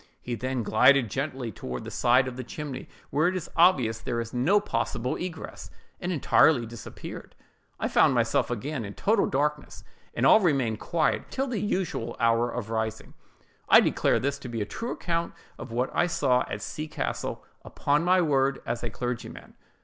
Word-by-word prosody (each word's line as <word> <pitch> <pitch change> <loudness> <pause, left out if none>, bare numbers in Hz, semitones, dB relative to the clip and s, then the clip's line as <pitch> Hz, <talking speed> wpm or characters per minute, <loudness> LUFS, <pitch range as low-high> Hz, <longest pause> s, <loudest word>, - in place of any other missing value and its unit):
He 120 - -5
then 130 +1 -2
glided 120 +1 +4
gently 135 -3 -3
away - - -7
toward 65 -6 -6
the - - -7
side 125 +2 +3
of 130 - -5
the 130 - -5
chimney, 135 +1 -7 0.2
where 155 +4 +2
it 185 - 0
is 180 - -5
obvious 135 -11 +4
there 115 +1 -3
is 115 -1 -5
no 150 +12 +3
possible 125 - -2
egress, 175 -3 -7 0.3
and 180 0 -3
entirely 150 -5 +4
disappeared. 115 0 -9 0.4
I - - 0
found - - +4
myself - - +1
again 120 +3 -3
in 100 -1 -7
total 210 0 +2
darkness, 150 +2 -2 0.3
and - - +1
all 220 - +8
remained 135 - +1
quiet 165 -3 0
until 270 - -2
the 245 -6 -3
usual 175 - -2
hour 115 +1 +3
of 115 -2 -5
rising. 110 0 -3 0.6
I - - +9
declare - - +2
this 140 +1 -2
to 130 - -8
be 115 -1 -4
a 105 - -1
true 230 - -5
account 170 -1 -2 0.2
of - - -8
what 125 +3 -1
I 175 - +3
saw 130 -7 +2
at - - -5
C—— 155 0 -5
castle, 70 - -4 0.2
upon 145 +3 0
my 185 +1 +4
word 135 -3 +2
as 120 - -3
a 120 - -3
clergyman." 120 +1 -6
130 Hz, 185 wpm, -27 LUFS, 115-160 Hz, 0.6 s, I